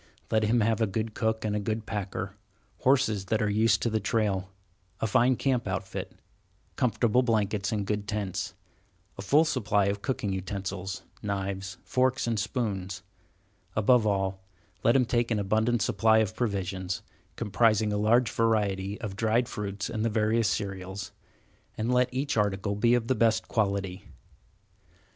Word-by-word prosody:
Let 110 Hz, -, +3 dB
him 115 Hz, +2 st, +3 dB
have 110 Hz, +1 st, +1 dB
a 110 Hz, -, +3 dB
good 110 Hz, +3 st, -3 dB
cook 110 Hz, 0 st, -1 dB
and 105 Hz, -1 st, 0 dB
a -, -, +1 dB
good 110 Hz, +1 st, -2 dB
packer; 100 Hz, -3 st, -4 dB, 0.4 s
horses 125 Hz, -7 st, +2 dB
that 110 Hz, +2 st, 0 dB
are 105 Hz, -, +1 dB
used 105 Hz, -1 st, +3 dB
to 115 Hz, -, +2 dB
the 110 Hz, -, +1 dB
trail; 100 Hz, -3 st, 0 dB, 0.5 s
a -, -, 0 dB
fine 125 Hz, +4 st, +3 dB
camp 125 Hz, -3 st, 0 dB
outfit; 95 Hz, +1 st, -4 dB, 0.6 s
comfortable 120 Hz, 0 st, +2 dB
blankets 105 Hz, -5 st, 0 dB
and 105 Hz, -2 st, -1 dB
good 105 Hz, 0 st, -2 dB
tents; 100 Hz, -2 st, -3 dB, 0.6 s
a -, -, -2 dB
full 145 Hz, +11 st, +4 dB
supply 110 Hz, -9 st, +1 dB
of 100 Hz, +1 st, -1 dB
cooking 125 Hz, -6 st, -2 dB
utensils, 95 Hz, 0 st, -4 dB, 0.2 s
knives, 95 Hz, -2 st, -3 dB
forks, 130 Hz, 0 st, +1 dB
and 115 Hz, -2 st, 0 dB
spoons; 100 Hz, -4 st, -3 dB, 0.7 s
above 110 Hz, +1 st, +4 dB
all, 95 Hz, -1 st, -1 dB, 0.4 s
let 115 Hz, -, +4 dB
him 130 Hz, -2 st, +4 dB
take 120 Hz, 0 st, +1 dB
an 115 Hz, -, +1 dB
abundant 110 Hz, +3 st, +1 dB
supply 110 Hz, +3 st, +3 dB
of 110 Hz, -4 st, +1 dB
provisions, 95 Hz, -5 st, -2 dB, 0.3 s
comprising 110 Hz, 0 st, +2 dB
a -, -, 0 dB
large 115 Hz, +3 st, +3 dB
variety 105 Hz, -3 st, 0 dB
of 105 Hz, -4 st, -4 dB
dried 115 Hz, +3 st, +1 dB
fruits 100 Hz, -1 st, -4 dB
and 110 Hz, -2 st, -3 dB
the 115 Hz, -, +2 dB
various 110 Hz, +1 st, +2 dB
cereals, 95 Hz, -1 st, -4 dB, 0.7 s
and 115 Hz, +3 st, 0 dB
let 125 Hz, 0 st, +3 dB
each 140 Hz, +3 st, -1 dB
article 100 Hz, -1 st, +1 dB
be 115 Hz, +4 st, +3 dB
of 115 Hz, -2 st, -1 dB
the 130 Hz, -, +3 dB
best 110 Hz, -1 st, +2 dB
quality. 100 Hz, -4 st, -1 dB
105 Hz, 155 wpm, -28 LUFS, 100-115 Hz, 0.7 s, full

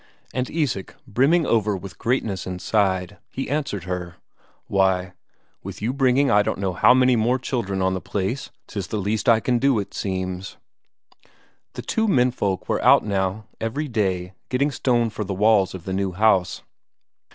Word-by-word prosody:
And 130 Hz, 0 st, -2 dB
Isak, 140 Hz, -, -2 dB
brimming 135 Hz, +8 st, +3 dB
over 105 Hz, -5 st, +1 dB
with 95 Hz, -3 st, -10 dB
greatness 110 Hz, -8 st, -1 dB
inside, 95 Hz, 0 st, -1 dB
he 135 Hz, -, -4 dB
answered 140 Hz, -, -2 dB
her: 90 Hz, -1 st, -5 dB, 0.5 s
"Why, 95 Hz, -2 st, +1 dB, 0.5 s
with 95 Hz, -1 st, -8 dB
you 115 Hz, +5 st, -1 dB
bringing 135 Hz, 0 st, +3 dB
I 105 Hz, -, +5 dB
don't -, -, -1 dB
know 95 Hz, -2 st, -2 dB
how 125 Hz, +7 st, +5 dB
many 130 Hz, -1 st, +4 dB
more 120 Hz, +3 st, +2 dB
children 100 Hz, -7 st, -2 dB
on 95 Hz, 0 st, +1 dB
the 95 Hz, -, -3 dB
place, 105 Hz, +8 st, -3 dB, 0.2 s
'tis 100 Hz, -3 st, -5 dB
the 110 Hz, -, -3 dB
least 105 Hz, +3 st, 0 dB
I 115 Hz, -1 st, +6 dB
can 120 Hz, +1 st, +1 dB
do, 135 Hz, -1 st, +3 dB
it 100 Hz, -, -4 dB
seems." 95 Hz, -1 st, -4 dB, 1.2 s
The -, -, -7 dB
two 225 Hz, 0 st, 0 dB
menfolk 125 Hz, -, +1 dB
were -, -, -1 dB
out -, -, +6 dB
now 100 Hz, +1 st, -1 dB
every 130 Hz, +7 st, -2 dB
day 95 Hz, -6 st, -1 dB, 0.2 s
getting 140 Hz, +3 st, +1 dB
stone 120 Hz, -4 st, +1 dB
for 105 Hz, -, -4 dB
the 95 Hz, -1 st, -4 dB
walls 100 Hz, -2 st, +3 dB
of 90 Hz, -, -9 dB
the 95 Hz, -, -3 dB
new 95 Hz, -1 st, -1 dB
house. 95 Hz, -2 st, +2 dB
105 Hz, 170 wpm, -23 LUFS, 95-125 Hz, 1.2 s, I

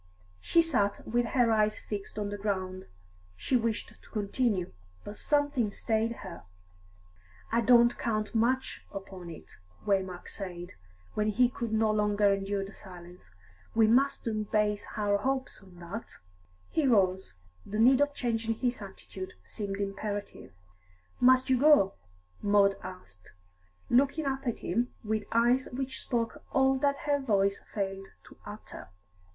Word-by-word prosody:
She 335 Hz, -, +3 dB
sat 215 Hz, -11 st, 0 dB
with 240 Hz, +2 st, +1 dB
her 240 Hz, -1 st, +3 dB
eyes 215 Hz, -1 st, +2 dB
fixed 205 Hz, 0 st, -6 dB
on 205 Hz, -1 st, -2 dB
the 205 Hz, -, -4 dB
ground. 185 Hz, -2 st, -3 dB, 0.5 s
She 255 Hz, -, -1 dB
wished 230 Hz, -2 st, -1 dB
to -, -, -19 dB
continue, 205 Hz, -3 st, -1 dB, 0.3 s
but 205 Hz, -, -8 dB
something 290 Hz, -6 st, +1 dB
stayed 220 Hz, +2 st, 0 dB
her. 175 Hz, -3 st, -8 dB, 1.1 s
"I 230 Hz, +1 st, +3 dB
don't 240 Hz, 0 st, +6 dB
much -, -, -20 dB, 0.8 s
count -, -, -29 dB
upon 190 Hz, -3 st, -8 dB
it," 165 Hz, -, -11 dB, 0.3 s
Waymark 190 Hz, -3 st, -1 dB
said, 175 Hz, -3 st, -7 dB, 0.4 s
when 210 Hz, 0 st, 0 dB
he 240 Hz, +4 st, +3 dB
could 235 Hz, -2 st, -4 dB
no 220 Hz, 0 st, +3 dB
longer 210 Hz, -1 st, +3 dB
endure 195 Hz, 0 st, -2 dB
the 195 Hz, -, -11 dB
silence. 180 Hz, -, -13 dB, 0.5 s
"We 225 Hz, -1 st, +6 dB
mustn't 230 Hz, -3 st, +1 dB
base 210 Hz, -1 st, +1 dB
any 205 Hz, -1 st, +2 dB
hopes 265 Hz, +4 st, -2 dB
on 190 Hz, -2 st, -17 dB
that." 180 Hz, +6 st, -7 dB, 0.6 s
He 310 Hz, -4 st, +2 dB
rose; 190 Hz, -, +2 dB, 0.3 s
the 210 Hz, -, -5 dB
need 255 Hz, +5 st, +6 dB
of 290 Hz, 0 st, +1 dB
changing 225 Hz, -2 st, -1 dB
his 245 Hz, 0 st, -1 dB
attitude 190 Hz, -1 st, -8 dB
seemed 200 Hz, -, -5 dB
imperative. 200 Hz, -, -4 dB, 0.7 s
"Must 255 Hz, +1 st, +5 dB
you 260 Hz, -2 st, +3 dB
go?" 285 Hz, -9 st, +6 dB, 0.5 s
Maud 200 Hz, -1 st, +4 dB
asked, 180 Hz, -, -11 dB, 0.5 s
looking 280 Hz, +5 st, +3 dB
up 270 Hz, -1 st, -2 dB
at 235 Hz, -, 0 dB
him 240 Hz, +2 st, -1 dB
with 215 Hz, -1 st, -1 dB
eyes 240 Hz, +3 st, +3 dB
which 260 Hz, +1 st, -3 dB
spoke 230 Hz, -2 st, -2 dB
all 265 Hz, 0 st, +3 dB
that 280 Hz, 0 st, +2 dB
her 290 Hz, -1 st, +2 dB
voice 200 Hz, -6 st, +1 dB
failed 195 Hz, -2 st, -3 dB, 0.2 s
to -, -, -16 dB
utter. -, -, -9 dB
215 Hz, 145 wpm, -30 LUFS, 195-245 Hz, 1.1 s, don't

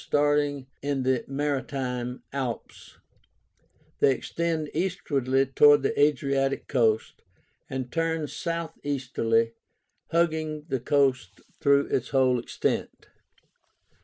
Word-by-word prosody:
Starting 145 Hz, -2 st, +1 dB, 0.2 s
in 140 Hz, -2 st, -1 dB
the 130 Hz, -2 st, +1 dB
Maritime 135 Hz, -3 st, -3 dB
Alps, 130 Hz, -5 st, -5 dB, 1.0 s
they -, -, +5 dB
extend 165 Hz, +2 st, -2 dB
easterly 140 Hz, -7 st, 0 dB
towards 145 Hz, +2 st, +5 dB
the 140 Hz, -, +1 dB
Adriatic 140 Hz, -1 st, +1 dB
coast, 110 Hz, -4 st, +1 dB, 0.5 s
and 130 Hz, -2 st, -4 dB
turn 165 Hz, -2 st, -1 dB
southeasterly 135 Hz, -9 st, -1 dB, 0.6 s
hugging 155 Hz, -2 st, 0 dB
the 135 Hz, -2 st, 0 dB
coast 130 Hz, -6 st, +1 dB, 0.2 s
through 140 Hz, 0 st, +4 dB
its 125 Hz, -, -1 dB
whole 130 Hz, -2 st, +3 dB
extent. 120 Hz, -, -3 dB
140 Hz, 95 wpm, -26 LUFS, 130-150 Hz, 1.0 s, they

